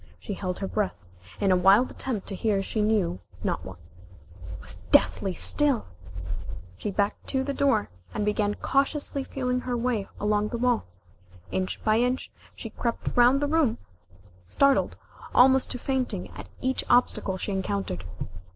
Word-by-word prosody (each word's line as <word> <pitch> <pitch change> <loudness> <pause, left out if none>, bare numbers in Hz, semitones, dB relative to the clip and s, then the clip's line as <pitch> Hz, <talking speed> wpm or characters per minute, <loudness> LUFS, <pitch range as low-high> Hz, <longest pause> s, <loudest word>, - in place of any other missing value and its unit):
She 205 - -5
held 185 -2 -3
her 195 - -3
breath, 210 -1 -1 0.4
in 195 - +2
a - - +6
wild 195 +7 +5
attempt 230 -7 -3
to 195 - -4
hear 200 -1 +1
she 215 - -2
knew 210 - +1 0.2
not - - -1
what. 95 -1 -9 0.7
It 90 - -9
was 90 0 -5
deathly 95 - +4
still! 290 -5 +3 0.9
She 150 - -4
backed 200 +1 -1
to 265 -1 0
the 280 +1 -2
door, 270 -7 +1 0.2
and 210 - -2
began 210 0 +1
cautiously 275 0 0
feeling 250 -2 -2
her 250 -1 -2
way 230 -4 -1
along 210 0 +1
the 235 - -3
wall. 245 - +1 0.7
Inch 95 0 -2
by 215 +1 +3
inch, 250 +2 0 0.2
she - - -7
crept 235 -1 -3
round 245 +3 +5
the - - +2
room, 300 -6 +2 0.7
startled 275 - +3 0.4
almost 260 +1 +6
to - - -4
fainting 260 0 -2
at - - -10
each 260 +1 0
obstacle 200 -6 +3
she 200 - -3
encountered. 190 - -2
215 Hz, 160 wpm, -27 LUFS, 195-255 Hz, 0.9 s, a